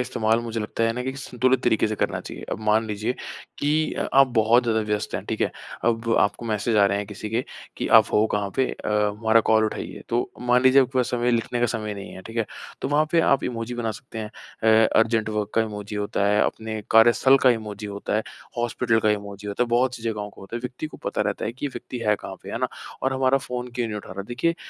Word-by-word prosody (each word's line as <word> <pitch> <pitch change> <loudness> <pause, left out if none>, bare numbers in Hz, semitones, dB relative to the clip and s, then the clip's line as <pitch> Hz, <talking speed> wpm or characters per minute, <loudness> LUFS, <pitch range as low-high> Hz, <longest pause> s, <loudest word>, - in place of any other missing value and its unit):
इस्तेमाल 115 -3 +1
मुझे 115 -1 -4
लगता 110 +2 -1
है 115 - +2
ना 125 +2 -3
कि 130 +1 -3
संतुलित 130 -1 0
तरीके 110 -2 +3
से 110 - -2
करना - - -1
चाहिए। - - -8
अब - - -3
मान 110 +1 +2
लीजिए 105 +3 -2 0.4
कि 155 +2 +1
अ, - - -2
आप 135 0 +7
बहुत 115 +3 +5
ज़्यादा 110 -2 +1
व्यस्त 105 -1 -2
हैं। - - -3
ठीक - - -3
है? - - +2 0.3
अब 115 -1 +1
आपको 105 +3 +1
मैसेज 110 +1 0
आ 100 - +6
रहे 100 +1 0
हैं 105 - -4
किसी 105 +1 -7
के 115 +3 0 0.3
कि, - - -2
"आप 110 -2 +7
हो 105 - +4
कहाँ 100 -1 -1
पे? 130 - +3
अ, - - -6
हमारा 105 +2 +3
कॉल 110 0 +5
उठाइए।" 110 - -4
तो 120 +1 0
मान 125 +1 +3
लीजिए 130 +1 +7
आपके 130 0 -2
पास 125 0 +1
समय 120 0 +1
लिखने 120 +1 0
का 120 - +3
समय 110 -3 -3
नहीं 100 -1 -8
है। 95 - -10
ठीक 115 +4 -10
है? 115 - +1 0.4
तो - - -1
वहाँ 150 +2 +3
पे 170 - +5
आप 140 -4 +3
इमोजी 120 0 -3
बना 115 -2 -2
सकते 120 -4 -9
हैं। 105 0 -5 0.5
अ, - - +3
अर्जेंट 110 -1 +2
वर्क 105 -1 -2
का - - +4
इमोजी 105 -1 -6
होता 100 -1 0
है, 105 +1 +3
अपने 110 -1 -3
कार्यस्थल 120 +4 +6
का 130 - +7
इमोजी 105 -3 -3
होता 100 0 -4
है, 110 - +1 0.3
हॉस्पिटल 120 -1 +1
का 110 - +3
इमोजी 100 0 -4
होता 100 +4 0
है, - - +1
बहुत-सी 125 0 +1
जगहों 105 -3 -3
का - - -17
होता 100 +5 -6
है - - -5
व्यक्ति 125 +5 -5
को - - -11
पता - - -2
रहता - - -1
है 115 - -2
कि 130 +4 -4
यह - - -4
व्यक्ति 125 - -6
है 105 - +5
कहाँ - - -8
पे, - - -8
है - - -3
ना? - - 0 0.3
और 135 0 +1
हमारा 130 +1 +3
फ़ोन 125 -2 -5
क्यों 120 -2 -1
नहीं 105 -1 -4
उठा 105 - -8
रहा 95 +1 -5
है। 100 - -8
देखिए, 120 +9 0
115 Hz, 260 wpm, -24 LUFS, 105-125 Hz, 0.5 s, आप